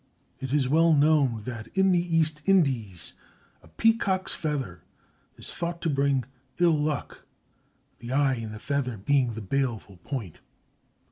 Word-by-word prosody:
It 130 Hz, -2 st, -5 dB
is 140 Hz, -3 st, +2 dB
well 165 Hz, +4 st, +4 dB
known 145 Hz, -7 st, +3 dB
that 115 Hz, -1 st, -6 dB
in 190 Hz, 0 st, +4 dB
the 180 Hz, -, +4 dB, 0.2 s
East 155 Hz, -1 st, +1 dB
Indies 130 Hz, -, +2 dB, 0.5 s
a -, -, -19 dB
peacock's 195 Hz, -, +2 dB
feather 140 Hz, -, -3 dB, 0.6 s
is -, -, -5 dB
thought 170 Hz, 0 st, -3 dB
to 165 Hz, -, +1 dB
bring 140 Hz, -1 st, +1 dB, 0.3 s
ill 175 Hz, -2 st, +4 dB
luck, 150 Hz, -4 st, -3 dB, 0.8 s
the 120 Hz, +1 st, -7 dB
eye 135 Hz, 0 st, +3 dB
in 115 Hz, -3 st, -5 dB
the 110 Hz, -, -7 dB
feather 130 Hz, -1 st, -2 dB
being 125 Hz, +3 st, +1 dB
the 115 Hz, -, -5 dB
baleful 115 Hz, -4 st, -2 dB
point. 110 Hz, -, -6 dB
140 Hz, 145 wpm, -27 LUFS, 115-155 Hz, 0.8 s, well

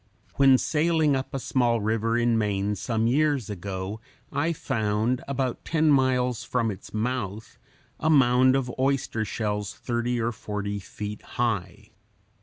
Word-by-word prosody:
When 135 Hz, -2 st, +6 dB
sailing 155 Hz, 0 st, +2 dB
up 130 Hz, 0 st, -3 dB
a -, -, -2 dB
small 120 Hz, -3 st, +1 dB
river 110 Hz, +2 st, 0 dB
in 120 Hz, -1 st, +2 dB
Maine 105 Hz, -2 st, 0 dB
some 110 Hz, +3 st, -1 dB
years 140 Hz, -2 st, +1 dB
ago, 95 Hz, +2 st, -5 dB, 0.3 s
I 150 Hz, +4 st, 0 dB
found, 115 Hz, -4 st, -1 dB
about 135 Hz, -3 st, -2 dB
ten 155 Hz, -1 st, +2 dB
miles 125 Hz, -3 st, +2 dB
from 115 Hz, -3 st, 0 dB
its 95 Hz, 0 st, -10 dB
mouth, 110 Hz, -2 st, -3 dB, 0.4 s
a 160 Hz, -, +1 dB
mound 130 Hz, -3 st, +5 dB
of 125 Hz, -3 st, -1 dB
oyster 135 Hz, -4 st, 0 dB
shells 105 Hz, -2 st, -3 dB
thirty 120 Hz, 0 st, -2 dB
or 115 Hz, +1 st, 0 dB
forty 105 Hz, -2 st, -4 dB
feet 105 Hz, +2 st, -7 dB
high. 105 Hz, -7 st, -3 dB
120 Hz, 140 wpm, -26 LUFS, 105-130 Hz, 0.4 s, When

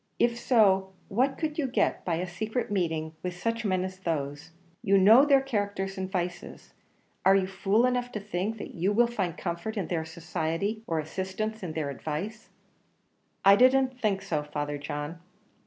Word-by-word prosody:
If 235 Hz, 0 st, +2 dB
so, 195 Hz, -6 st, +3 dB, 0.2 s
what 260 Hz, +6 st, +1 dB
could 310 Hz, -1 st, -3 dB
you 280 Hz, -, +1 dB
get 255 Hz, -, 0 dB
by 170 Hz, -, 0 dB
a 175 Hz, +3 st, -2 dB
secret 220 Hz, +6 st, -3 dB
meeting 160 Hz, -5 st, -1 dB
with 180 Hz, -1 st, -4 dB
such 230 Hz, +4 st, -2 dB
men 185 Hz, -3 st, +1 dB
as 185 Hz, 0 st, -6 dB
those? 150 Hz, -3 st, -3 dB, 0.3 s
You 195 Hz, +1 st, +4 dB
know 220 Hz, +8 st, +7 dB
their 275 Hz, -2 st, +5 dB
characters 205 Hz, -6 st, -2 dB
and 190 Hz, 0 st, -4 dB
vices; 180 Hz, -2 st, -4 dB, 0.5 s
are 195 Hz, -, +6 dB
you 195 Hz, -1 st, +3 dB
fool 195 Hz, +4 st, +2 dB
enough 245 Hz, -1 st, 0 dB
to 210 Hz, -, -2 dB
think 205 Hz, +2 st, -3 dB
that -, -, -8 dB
you 185 Hz, +5 st, 0 dB
will 240 Hz, +3 st, +5 dB
find 200 Hz, -8 st, -2 dB
comfort 175 Hz, +5 st, -4 dB
in 195 Hz, -, -2 dB
their 165 Hz, -3 st, -1 dB
society, 170 Hz, +5 st, -3 dB
or 165 Hz, -, -1 dB
assistance 190 Hz, +7 st, -3 dB
in 175 Hz, -4 st, -5 dB
their 150 Hz, -3 st, -2 dB
advice?" 165 Hz, -, -5 dB, 1.0 s
"I 195 Hz, 0 st, +9 dB
didn't 255 Hz, +2 st, +4 dB
think 200 Hz, -4 st, 0 dB
so, 160 Hz, -6 st, -1 dB
Father 145 Hz, 0 st, -4 dB
John." 150 Hz, +3 st, -5 dB
195 Hz, 175 wpm, -28 LUFS, 170-220 Hz, 1.0 s, I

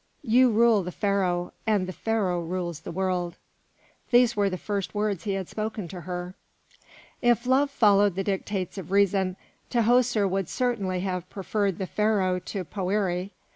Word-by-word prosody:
You 250 Hz, +3 st, +5 dB
rule 225 Hz, -1 st, +4 dB
the 180 Hz, 0 st, -5 dB
Pharaoh, 185 Hz, -3 st, 0 dB
and 210 Hz, -4 st, +2 dB
the 185 Hz, -, -5 dB
Pharaoh 195 Hz, -6 st, 0 dB
rules 170 Hz, -1 st, -3 dB
the -, -, -8 dB
world." 180 Hz, -1 st, -1 dB, 0.7 s
These 240 Hz, -1 st, +5 dB
were 200 Hz, -1 st, +2 dB
the 185 Hz, -, -3 dB
first 200 Hz, +1 st, -3 dB
words 205 Hz, -5 st, -1 dB
he 200 Hz, -, 0 dB
had 190 Hz, -2 st, -3 dB
spoken 215 Hz, -3 st, -4 dB
to 180 Hz, 0 st, -7 dB
her. 180 Hz, +1 st, -5 dB, 0.9 s
If 240 Hz, 0 st, +3 dB
love 265 Hz, +3 st, +3 dB
followed 205 Hz, -7 st, +4 dB
the 195 Hz, -, -1 dB
dictates 195 Hz, -1 st, -3 dB
of 185 Hz, -, -8 dB
reason, 195 Hz, -1 st, +2 dB, 0.3 s
Tahoser 235 Hz, -2 st, +3 dB
would 190 Hz, -1 st, -1 dB
certainly 205 Hz, -8 st, -1 dB
have 180 Hz, -1 st, -3 dB
preferred 200 Hz, -1 st, -1 dB
the 190 Hz, -, -2 dB
Pharaoh 195 Hz, -3 st, +1 dB
to 185 Hz, 0 st, -5 dB
Poëri. 190 Hz, -1 st, -1 dB
195 Hz, 160 wpm, -26 LUFS, 185-215 Hz, 0.9 s, You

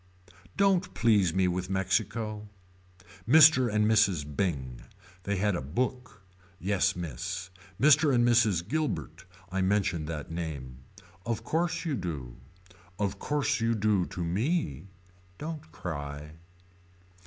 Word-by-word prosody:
Don't 195 Hz, -2 st, +2 dB
please 105 Hz, -7 st, +3 dB
me 95 Hz, +2 st, +2 dB
with 90 Hz, +1 st, -2 dB
Mexico. 105 Hz, +3 st, -1 dB, 0.8 s
Mr. 140 Hz, -5 st, +7 dB
and 105 Hz, 0 st, +2 dB
Mrs. 105 Hz, -8 st, +3 dB
Bing. 65 Hz, -10 st, -2 dB, 0.4 s
They 100 Hz, -, 0 dB
had 100 Hz, 0 st, +1 dB
a -, -, -2 dB
book. 125 Hz, -, -3 dB, 0.3 s
Yes 100 Hz, +1 st, +1 dB
Miss. 90 Hz, +3 st, -5 dB, 0.3 s
Mr. 150 Hz, +1 st, +5 dB
and 120 Hz, -2 st, +3 dB
Mrs. 110 Hz, -8 st, +3 dB
Guilbert. 155 Hz, +4 st, -3 dB, 0.3 s
I 95 Hz, +1 st, -1 dB
mention 95 Hz, -4 st, +1 dB
that 75 Hz, -1 st, -5 dB
name. 70 Hz, -7 st, -5 dB, 0.4 s
Of 115 Hz, 0 st, -3 dB
course 165 Hz, +7 st, -1 dB
you 160 Hz, -, -1 dB
do. 75 Hz, -, -5 dB, 0.6 s
Of 100 Hz, -2 st, -2 dB
course 145 Hz, -3 st, 0 dB
you 115 Hz, 0 st, +1 dB
do 105 Hz, -4 st, +1 dB
to 90 Hz, -, -5 dB
me. 100 Hz, -, -1 dB, 0.5 s
Don't 155 Hz, -, -7 dB
cry. 75 Hz, -4 st, -6 dB
100 Hz, 120 wpm, -29 LUFS, 85-120 Hz, 0.8 s, Mr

